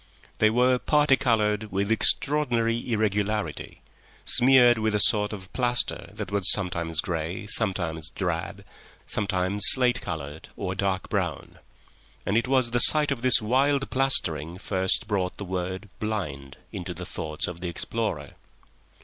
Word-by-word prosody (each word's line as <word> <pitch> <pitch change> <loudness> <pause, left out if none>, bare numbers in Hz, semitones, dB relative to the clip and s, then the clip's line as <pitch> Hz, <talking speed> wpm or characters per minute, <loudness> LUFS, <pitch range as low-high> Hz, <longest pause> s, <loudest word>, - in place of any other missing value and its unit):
They 110 - +4
were 125 +2 +2
parti 150 -1 +3
coloured 110 -5 -1
with 100 +2 -2
extraordinary 120 -1 +2
irregularity, 105 -5 -2 0.4
smeared 125 -2 +4
with 110 -1 -1
a - - +1
sort 105 0 +2
of 95 -2 -10
plaster 125 -1 -1
that - - -6
was 100 -3 +2
sometimes 85 -4 0
grey, 85 +3 -4
sometimes 85 -7 -1
drab, 85 0 -5 0.4
sometimes 100 -1 -1
slate 125 -1 +4
coloured 80 -4 -7
or 95 - -4
dark 95 -1 -2
brown; - - -4 0.7
and 100 - -1
it 115 +2 +1
was 130 -3 +1
the 120 - +1
sight 150 +2 +6
of 130 -4 -3
this 125 -3 +5
wild 135 +4 0
plastering 85 - 0
first 95 -1 0
brought 95 -4 -2
the 100 - -7
word 95 +2 -5
"blind" 75 -10 -5
into 90 -4 -7
the 90 +2 -8
thoughts 75 -3 -4
of 90 -1 -7
the 90 - -4
explorer. 85 - -4
105 Hz, 140 wpm, -25 LUFS, 90-120 Hz, 0.7 s, sight